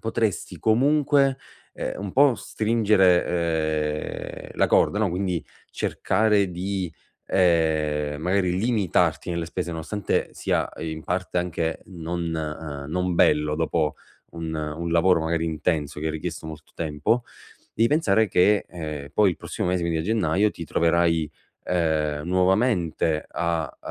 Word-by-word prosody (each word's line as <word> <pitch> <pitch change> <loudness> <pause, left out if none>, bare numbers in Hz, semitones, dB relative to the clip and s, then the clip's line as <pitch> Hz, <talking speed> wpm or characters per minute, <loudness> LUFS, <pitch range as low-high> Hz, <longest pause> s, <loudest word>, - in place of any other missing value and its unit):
potresti 110 -2 -2
comunque, 140 +3 +3 0.3
ehm, - - -4
un 100 -2 -5
po' 140 -2 +5
stringere, 105 -5 +3 1.3
ehm, - - -13
la - - +3
corda, 105 - +3
no, 110 -3 +2
quindi 90 -1 -2 0.3
cercare 105 -3 +1
di, 90 -1 -3 0.3
ehm, 80 -4 +1
magari 90 0 +1
limitarti 90 -8 +1
nelle 85 -1 -2
spese, 85 0 -4
nonostante 85 +5 -2
sia - - -1
in 80 -1 -5
parte 90 0 -1
anche 85 -2 -2
non, 85 -2 -4
uhm, 75 -2 -5
non 90 0 0
bello 75 -2 +3
dopo 80 -1 0 0.4
un 80 -1 -5
un 80 +2 -3
lavoro 85 +1 +4
magari 80 0 0
intenso 75 -2 -1
che 80 - -1
ha - - -1
richiesto 80 +1 -5
molto 80 -1 -10
tempo, 80 +9 0 0.5
devi 115 +1 +3
pensare 110 -8 +3
che, 100 +4 +3
ehm, 75 -4 -6
poi 105 -3 +5
il 85 - -4
prossimo - - -4
mese, 90 -1 +1
quindi 85 -1 0
a - - -1
gennaio, 105 0 +2
ti 85 - -8
troverai, 85 -1 +2 0.3
ehm, 80 -4 0
nuovamente 90 -4 +1
a, 85 -4 -2
85 Hz, 135 wpm, -24 LUFS, 80-100 Hz, 1.3 s, po